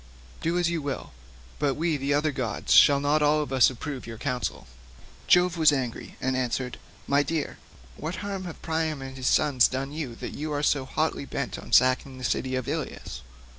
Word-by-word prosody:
Do 170 Hz, +2 st, 0 dB
as 175 Hz, -1 st, +2 dB
you 170 Hz, -1 st, -1 dB
will, 140 Hz, -2 st, -4 dB, 0.5 s
but 140 Hz, -2 st, +1 dB
we 150 Hz, -4 st, -1 dB
other 150 Hz, +2 st, +2 dB
gods 130 Hz, -5 st, -1 dB
shall 140 Hz, -1 st, +7 dB
not 145 Hz, +2 st, +2 dB
all 150 Hz, +1 st, +4 dB
of 140 Hz, -, -6 dB
us 130 Hz, -2 st, +6 dB
approve 130 Hz, 0 st, -6 dB
your 115 Hz, -1 st, -7 dB
counsel." 125 Hz, 0 st, -3 dB, 0.6 s
Jove 180 Hz, -1 st, +4 dB
was 155 Hz, -1 st, +6 dB
angry 130 Hz, -4 st, -3 dB
and 130 Hz, 0 st, 0 dB
answered, 125 Hz, 0 st, -2 dB, 0.3 s
"My 140 Hz, +1 st, +3 dB
dear, 155 Hz, 0 st, -3 dB, 0.4 s
what 160 Hz, +3 st, -4 dB
harm 195 Hz, -2 st, -4 dB
have 175 Hz, -, -7 dB
Priam 160 Hz, -3 st, -1 dB
and 135 Hz, 0 st, -8 dB
his 130 Hz, -1 st, -3 dB
sons 135 Hz, -5 st, +4 dB
done 135 Hz, +2 st, -4 dB
you 145 Hz, -6 st, -5 dB
that -, -, -6 dB
you 150 Hz, +1 st, -4 dB
are 145 Hz, 0 st, -1 dB
so 140 Hz, -3 st, +2 dB
hotly 155 Hz, +1 st, -1 dB
bent 140 Hz, -1 st, -4 dB
on -, -, -11 dB
sacking 130 Hz, +1 st, +3 dB
the 130 Hz, -, -9 dB
city 130 Hz, +2 st, -1 dB
of 130 Hz, -2 st, -3 dB
Ilius? -, -, -4 dB
140 Hz, 195 wpm, -26 LUFS, 130-155 Hz, 0.6 s, shall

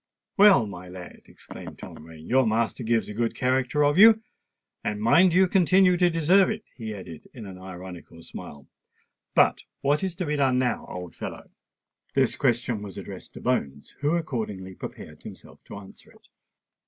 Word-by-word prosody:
"Well, 200 Hz, -, +6 dB
my 90 Hz, -3 st, -9 dB
lad," 90 Hz, -1 st, -11 dB
exclaimed -, -, -11 dB
Tom -, -, -10 dB
Rain, 80 Hz, 0 st, -13 dB
"your 130 Hz, -1 st, +3 dB
master 115 Hz, +3 st, 0 dB
gives 115 Hz, 0 st, +1 dB
a -, -, -7 dB
good 115 Hz, +1 st, -1 dB
character 130 Hz, +2 st, +1 dB
of 145 Hz, +4 st, +2 dB
you; 220 Hz, +1 st, +8 dB, 0.6 s
and 105 Hz, 0 st, -2 dB
mind 165 Hz, -, +5 dB
you 185 Hz, +2 st, +4 dB
continue 185 Hz, 0 st, +4 dB
to 175 Hz, 0 st, +3 dB
deserve 175 Hz, +4 st, +4 dB
it," 220 Hz, 0 st, -4 dB
he 110 Hz, -3 st, -6 dB
added 85 Hz, -5 st, -10 dB
with 115 Hz, -4 st, -8 dB
an 95 Hz, -2 st, -10 dB
ironical 90 Hz, -2 st, -10 dB
smile. 70 Hz, -2 st, -10 dB, 0.7 s
"But -, -, +4 dB, 0.2 s
what 145 Hz, +5 st, +1 dB
is 185 Hz, -3 st, -2 dB
to 180 Hz, 0 st, -3 dB
be 150 Hz, -1 st, -1 dB
done 135 Hz, -2 st, +2 dB
now, 125 Hz, -1 st, -1 dB
old 90 Hz, -3 st, -7 dB
fellow?" -, -, -8 dB, 0.6 s
This -, -, +2 dB
question 120 Hz, -2 st, 0 dB
was 100 Hz, -3 st, -9 dB
addressed -, -, -9 dB
to -, -, -9 dB
Bones, 70 Hz, +1 st, -2 dB
who 145 Hz, +3 st, +1 dB
accordingly 110 Hz, -, -4 dB
prepared -, -, -10 dB
himself -, -, -13 dB
to -, -, -9 dB
answer 100 Hz, -1 st, -14 dB
it. -, -, -22 dB
120 Hz, 175 wpm, -25 LUFS, -, 0.7 s, you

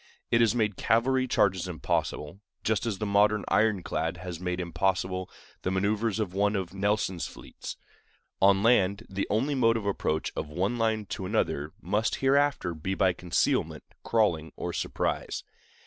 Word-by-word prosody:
It 115 Hz, -, +4 dB
has 115 Hz, 0 st, +4 dB
made 105 Hz, -4 st, 0 dB
cavalry 130 Hz, +4 st, +2 dB
charges 95 Hz, -6 st, +2 dB
impossible, 80 Hz, 0 st, -2 dB, 0.2 s
just 110 Hz, +1 st, 0 dB
as 105 Hz, -4 st, -1 dB
the 105 Hz, -, -3 dB
modern 105 Hz, +1 st, +3 dB
ironclad 95 Hz, -5 st, +1 dB
has 90 Hz, -1 st, -6 dB
made 90 Hz, 0 st, -2 dB
impossible 90 Hz, +1 st, -1 dB, 0.3 s
the -, -, -1 dB
manœuvers 105 Hz, +3 st, 0 dB
of 100 Hz, -5 st, -2 dB
one 100 Hz, +2 st, +2 dB
of 95 Hz, -2 st, -3 dB
Nelson's 100 Hz, -3 st, 0 dB
fleets. -, -, -9 dB, 0.6 s
On 100 Hz, 0 st, +5 dB
land, 105 Hz, -2 st, +3 dB
the 95 Hz, +1 st, -2 dB
only 125 Hz, +8 st, +1 dB
mode 115 Hz, -4 st, +3 dB
of 110 Hz, -, -5 dB
approach 80 Hz, -5 st, -1 dB
of 75 Hz, -, -4 dB
one 95 Hz, +10 st, -1 dB
line 110 Hz, -2 st, +1 dB
to 95 Hz, -, -4 dB
another 75 Hz, -3 st, -1 dB
must 105 Hz, +3 st, 0 dB
hereafter 135 Hz, -9 st, +2 dB
be 90 Hz, +5 st, -3 dB
by 95 Hz, -1 st, +3 dB
concealment, 90 Hz, -1 st, 0 dB, 0.2 s
crawling, 85 Hz, -9 st, +1 dB
or -, -, -4 dB
surprise. -, -, -2 dB
100 Hz, 155 wpm, -28 LUFS, 90-110 Hz, 0.6 s, On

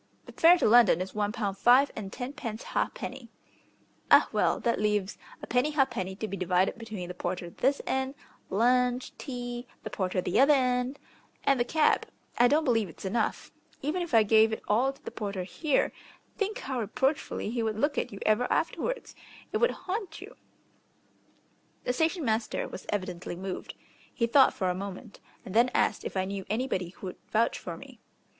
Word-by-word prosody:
"The -, -, -11 dB
fare 340 Hz, +2 st, +6 dB
to -, -, +2 dB
London 225 Hz, -6 st, +6 dB
is 185 Hz, +1 st, -4 dB
one 210 Hz, -1 st, 0 dB
pound 205 Hz, -4 st, -3 dB
five 255 Hz, +6 st, +5 dB
and 195 Hz, -3 st, -6 dB
tenpence 245 Hz, -3 st, -5 dB
ha'penny." 255 Hz, -3 st, -3 dB, 0.8 s
"Ah; -, -, +7 dB
well, -, -, +2 dB
that 235 Hz, -3 st, 0 dB
leaves 210 Hz, -2 st, 0 dB, 0.2 s
a -, -, -3 dB
penny 250 Hz, +5 st, +1 dB
ha'penny 225 Hz, -10 st, 0 dB
to 215 Hz, +2 st, -4 dB
be 200 Hz, -, -4 dB
divided 185 Hz, +3 st, +1 dB
between 215 Hz, -6 st, -6 dB
the 180 Hz, -, -6 dB
porter 175 Hz, -1 st, -4 dB
this 275 Hz, +8 st, 0 dB
end, 265 Hz, +1 st, -1 dB, 0.3 s
lunch, 250 Hz, +4 st, +2 dB
tea, 245 Hz, -2 st, -5 dB, 0.2 s
the 215 Hz, -, -6 dB
porter 185 Hz, -1 st, -1 dB
the 180 Hz, -, +1 dB
other 285 Hz, +2 st, +7 dB
end, 250 Hz, +1 st, 0 dB, 0.5 s
and 275 Hz, -2 st, +3 dB
the -, -, +4 dB
cab. 310 Hz, +4 st, +2 dB, 0.3 s
I 245 Hz, -, +7 dB
don't 300 Hz, +5 st, +3 dB
believe 225 Hz, -, +1 dB
it's 165 Hz, -, -11 dB
enough. 215 Hz, +3 st, -1 dB, 0.3 s
Even 310 Hz, +6 st, -1 dB
if 345 Hz, -8 st, -1 dB
I 225 Hz, -, +7 dB
gave 220 Hz, +1 st, +5 dB
it 220 Hz, -, -4 dB
all 245 Hz, +6 st, +3 dB
to 275 Hz, -, -21 dB
the -, -, -5 dB
porter 200 Hz, -3 st, -4 dB
here, 290 Hz, -, 0 dB, 0.4 s
think 420 Hz, +2 st, -2 dB
how 265 Hz, -, -4 dB
reproachfully 250 Hz, +1 st, -1 dB
he 235 Hz, 0 st, -1 dB
would 220 Hz, -1 st, -1 dB
look 290 Hz, +5 st, +1 dB
at -, -, -3 dB
you 200 Hz, -, -8 dB
ever 215 Hz, +3 st, +2 dB
afterwards. -, -, -1 dB, 0.4 s
It -, -, +2 dB
would 480 Hz, -, +3 dB, 0.2 s
haunt 375 Hz, -3 st, -4 dB
you." 405 Hz, +6 st, -11 dB, 1.5 s
The 250 Hz, -, 0 dB
station 320 Hz, +3 st, 0 dB
master 220 Hz, -1 st, -1 dB
was -, -, -9 dB
evidently 185 Hz, -4 st, -3 dB
moved. 185 Hz, +1 st, -6 dB, 0.4 s
He 235 Hz, -, 0 dB
thought 265 Hz, +3 st, +5 dB
for 185 Hz, -1 st, 0 dB
a -, -, -1 dB
moment, 200 Hz, +4 st, -7 dB, 0.3 s
and 185 Hz, -, -7 dB
then 235 Hz, +3 st, +5 dB
asked -, -, +1 dB
if -, -, -4 dB
I 190 Hz, -, +1 dB
knew 195 Hz, 0 st, -4 dB
anybody 215 Hz, -5 st, -1 dB
who 190 Hz, -, -11 dB
would 185 Hz, -, -6 dB
vouch 225 Hz, +2 st, +1 dB
for -, -, -6 dB
me. -, -, -13 dB
230 Hz, 185 wpm, -29 LUFS, 200-270 Hz, 1.5 s, Ah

